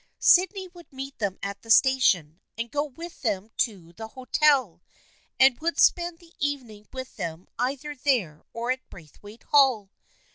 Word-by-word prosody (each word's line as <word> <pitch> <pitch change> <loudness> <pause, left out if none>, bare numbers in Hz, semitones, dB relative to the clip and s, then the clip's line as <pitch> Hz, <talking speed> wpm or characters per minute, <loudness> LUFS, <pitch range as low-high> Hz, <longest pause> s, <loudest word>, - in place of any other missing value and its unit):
Sydney 375 +1 +4
would 345 -2 -16
meet 270 +1 -8
them 200 -3 -2
at 200 0 -5
the 225 - -16
station 225 - +3 0.2
and 230 +1 -4
go 290 0 0
with 325 +5 -10
them 210 -3 -2
to 180 -7 -2
the 220 +5 -8
hotel, 260 - +1 0.6
and 260 -2 +5
would 335 +2 -2
spend 345 -1 +3
the 340 0 -21
evening 245 -8 -4
with 260 0 -8
them 170 -2 -5
either 275 +4 -2
there 240 - 0
or 235 +2 -2
at 260 0 -5
Braithwaite 205 +7 -14
Hall. 260 -9 +3
255 Hz, 155 wpm, -26 LUFS, 205-285 Hz, 0.6 s, and